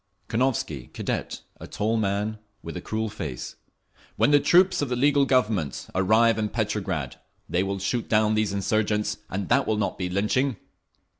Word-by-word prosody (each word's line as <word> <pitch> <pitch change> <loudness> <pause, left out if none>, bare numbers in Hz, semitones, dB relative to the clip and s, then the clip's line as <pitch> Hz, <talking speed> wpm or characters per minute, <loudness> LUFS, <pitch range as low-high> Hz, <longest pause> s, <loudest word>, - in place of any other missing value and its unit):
Konovski, 110 - -1
Cadet, - - -4 0.2
a - - -9
tall 105 +2 -1
old 115 -1 +1
man 105 +2 -1 0.2
with 85 - -7
a 90 - -5
cruel 110 +3 -2
face: 75 - -6 0.6
"When 145 - +3
the 145 - +6
troops 180 +5 +4
of 145 - -1
the 125 - 0
legal 140 +2 +3
Government 105 - +1
arrive 110 +4 +3
in 105 -1 0
Petrograd, 100 - -2 0.3
they 90 - 0
will 100 +1 -2
shoot 110 +5 -2
down 110 0 +3
these 110 -2 +1
insurgents, 105 +2 0
and 95 0 -3
that - - +3
will 110 - +1
not 105 - -2
be 90 -1 -2
lynching!" 105 +6 0
105 Hz, 170 wpm, -25 LUFS, 95-115 Hz, 0.6 s, the